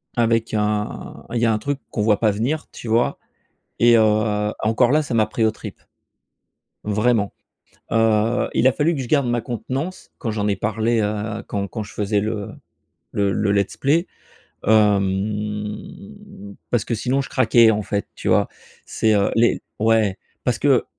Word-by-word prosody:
avec 115 -2 +1
un 105 0 -2
il 120 - 0
y 120 - +2
a 115 - +3
un 105 - +1
truc 140 +4 -3
qu'on 105 - -3
voit 105 -1 +3
pas 110 -2 +3
venir, 125 +10 -2
tu 120 - -9
vois? 115 +2 +1 0.6
Et, 120 0 +6
heu, - - +5 0.6
encore 110 +2 +2
là 155 +2 +4
ça 145 - -5
m'a 110 -2 +3
pris 110 +1 -1
aux 110 - +3
tripes. - - -10 1.0
Vraiment, 105 0 +1 0.6
heu, 115 +1 +2
il 125 - +3
a 130 - +5
fallu 160 +2 +1
que 135 - -3
je 125 - -5
garde 140 -3 +2
ma 120 0 0
contenance 130 - -5
quand 115 - -3
j'en 105 -1 -1
ai 100 - +1
parlé, 110 +2 0
heu, 105 +1 -3
quand 100 -1 -2
quand 110 +1 -5
je 105 - -12
faisais 105 -1 0
le 105 -1 -3 0.6
le 100 -1 +1
le 100 +1 0
let's 100 -1 0
play, 160 +6 +2 0.6
hem, 105 - -1
parce 120 -4 0
que 115 - -1
sinon 130 +5 0
je - - -7
craquais, 120 -3 +5
en 105 - -1
fait, 100 0 -3
tu - - -6
vois? - - +3 0.4
C'est, 110 -1 +1
heu 100 -1 +2
les 115 +1 +3 0.2
ouais. 110 -3 +2 0.3
Parce - - 0
que, - - +3
110 Hz, 175 wpm, -21 LUFS, 105-120 Hz, 1.0 s, Et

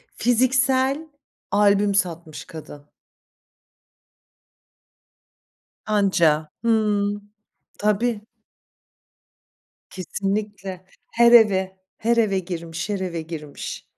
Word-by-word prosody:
fiziksel 260 +4 +2 0.4
albüm 205 -1 +3
satmış 170 -4 -2
kadın. 145 -2 -11 3.0
Anca 175 -8 +2
Hıı, 210 -3 +1 0.6
tabii. 210 +1 0 1.6
Kesinlikle, 195 0 -4 0.3
her 235 0 +5
eve, 190 -5 +5 0.2
her 235 +1 +1
eve 200 -4 +2
girmiş, 170 0 -6
her 200 -2 -1
eve 175 -3 -3
girmiş 155 -3 -7
200 Hz, 70 wpm, -23 LUFS, 175-220 Hz, 3.0 s, her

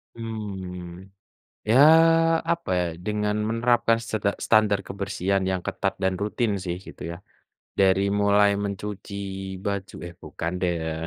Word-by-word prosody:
Mmm, 95 -5 -7 0.6
ya 110 +4 +4 0.7
apa 170 - -4
ya, 90 - +1 0.2
dengan 105 0 0
menerapkan 115 0 +2
seda 110 -2 -1 0.2
standar 110 -2 +4
kebersihan 100 0 -1
yang 95 - 0
ketat - - -2
dan 95 0 +2
rutin 105 +1 0
sih 90 -1 -3
gitu - - -10
ya, 85 - -6 0.6
dari 95 0 +4
mulai 100 0 +4
mencuci 100 +1 -5 0.5
baju 100 -2 -3
eh 85 - -12
bukan 85 +1 -4
deh 90 -1 +1
ya. 80 - -2
100 Hz, 130 wpm, -25 LUFS, 95-105 Hz, 0.7 s, ya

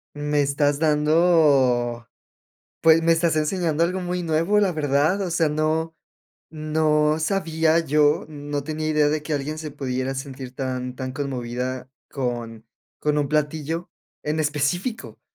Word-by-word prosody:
Me 145 0 0
estás 145 0 +1
dando 150 -7 +3 0.8
pues, 165 0 +6
me 165 0 +4
estás 165 0 +2
enseñando 160 0 0
algo 180 +2 0
muy 180 0 -3
nuevo, 165 +5 +1
la 195 -3 +2
verdad. 150 +4 +1
O 185 - -3
sea, 165 -2 +2
no 155 +2 -1 0.6
no 155 0 +1
sabía 160 -2 +1
yo, 150 -2 +2
no 145 -1 -5
tenía 155 +1 -3
idea 150 -1 +3
de 150 0 -1
que 150 0 -3
alguien 145 +2 -3
se 155 -1 -6
pudiera 130 -2 -3
sentir 130 -1 -7
tan 130 -1 -4
tan 130 -1 -4
conmovida 130 -1 -4 0.2
con 120 -4 -4 0.3
con 150 0 0
un 145 -1 0
platillo 155 +3 -1 0.4
en 150 +1 -1
específico. 155 - -2
150 Hz, 140 wpm, -23 LUFS, 140-160 Hz, 0.8 s, pues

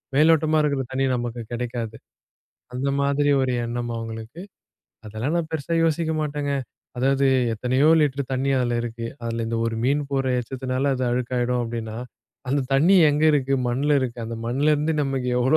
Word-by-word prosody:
மேலோட்டமா 155 +1 +4
இருக்கிற 140 -2 0
தண்ணி 135 +1 0
நமக்கு 120 -1 -4
கெடைக்காது. 120 -2 -4 0.8
அந்த 130 +3 -2
மாதிரி 140 +1 +2
ஒரு 130 -1 0
எண்ணம் 120 0 -3
அவுங்களுக்கு. 115 +6 -7 0.7
அதெல்லாம் 110 +9 -3
நான் 165 -2 -2
பெருசா 160 +1 -2
யோசிக்க 160 0 +1
மாட்டேங்க. 145 -1 -2 0.5
அதாவது, 135 +1 +2 0.3
எத்தனையோ 130 +6 +2
லிட்டர் 140 -2 0
தண்ணி, 135 +1 0
அதில 120 -1 0
இருக்கு. 115 0 -5 0.2
அதில 115 0 -2
இந்த 115 - -1
ஒரு 115 - -2
மீன் 145 +3 +2
போட்ற 135 -1 0
எச்சத்தினால, 130 +2 -2
அது 130 - -1
அழுக்காயிடும் 125 0 0
அப்டின்னா, 115 -1 -5 0.5
அந்த 140 +2 +1
தண்ணி 170 +8 +5
எங்க 150 +2 +1
இருக்கு, 135 -1 +1
மண்ல 140 +4 +2
இருக்கு. 125 -2 -3
அந்த 115 0 -5
மண்லருந்து, 150 +5 +1
நமக்கு 135 -2 -2
எவ்ளோ 130 +5 +4
130 Hz, 155 wpm, -23 LUFS, 120-145 Hz, 0.8 s, தண்ணி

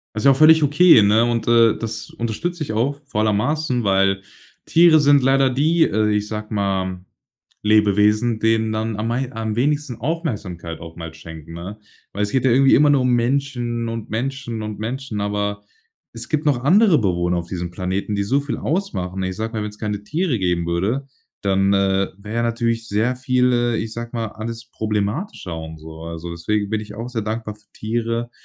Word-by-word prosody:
Ist 105 - -3
ja 140 - +7
auch - - 0
völlig 155 +2 +7
okay, 145 -3 +6
ne? 105 +3 +4
Und 115 -2 -1
das 115 -1 +2
unterstütze 160 +10 -3
ich 125 - -5
auch, 135 +6 -1
vor 105 -6 -2
aller 110 0 +2
Maßen, 125 +3 0
weil 95 0 +2 0.4
Tiere 165 -1 +6
sind 145 -2 +5
leider 135 0 +3
die, 155 +6 +2
äh, 105 +1 +1
ich 105 0 0
sage 105 0 -6
mal 95 -3 -1 0.6
Lebewesen, 105 +2 +3
denen 110 0 +2
dann 110 0 -2
am 110 +2 -2
mei 125 +2 -2
am 110 -1 -3
wenigsten 145 0 0
Aufmerksamkeit 105 - -4
auch 80 0 -10
mal 80 -1 -8
schenken, 80 0 -11
ne? 90 +5 -7 0.3
Weil 100 - -2
es 105 - -3
geht 130 -2 +1
ja 130 - +4
irgendwie 135 +3 +5
immer 145 +1 +5
nur 140 -2 +3
um 125 0 +2
Menschen 120 -2 -1
und 115 -1 -6
Menschen 120 0 -3
und 110 -1 -5
Menschen, 120 -1 -4
aber 105 0 -2 0.5
es 115 0 -7
gibt 155 0 -1
noch 140 -4 +3
andere 185 +2 +5
Bewohner 90 -5 0
auf 85 0 -6
diesem 90 -2 -4
Planeten, 95 +3 -3
die 100 - 0
so 135 +8 +1
viel 145 0 -4
ausmachen. 95 - -2
Ich 95 0 -3
sage 110 +2 -4
mal, 110 - -2
wenn's 105 0 -7
keine 105 -2 -3
Tiere 155 - -1
geben 90 -2 0
würde, 100 +11 -1 0.4
dann, 95 0 +2
äh, 95 0 +2
wäre 105 +3 -7
ja 120 - +1
natürlich 115 -1 -1
sehr 110 +5 +1
viel, 125 -1 +2
äh, 120 -1 +1
ich 110 0 -4
sage 115 0 -6
mal, 115 -1 -2
alles 115 +2 -7
problematischer 105 - -3
und 80 0 -8
so. 80 +1 -11
Also, 85 +1 -6
deswegen 100 +5 -2
bin 110 -1 0
ich 105 -1 -9
auch 115 +2 -6
sehr 120 -3 -3
dankbar 110 0 -4
für 105 0 -26
Tiere, 115 +1 -2
110 Hz, 195 wpm, -21 LUFS, 100-125 Hz, 0.6 s, ja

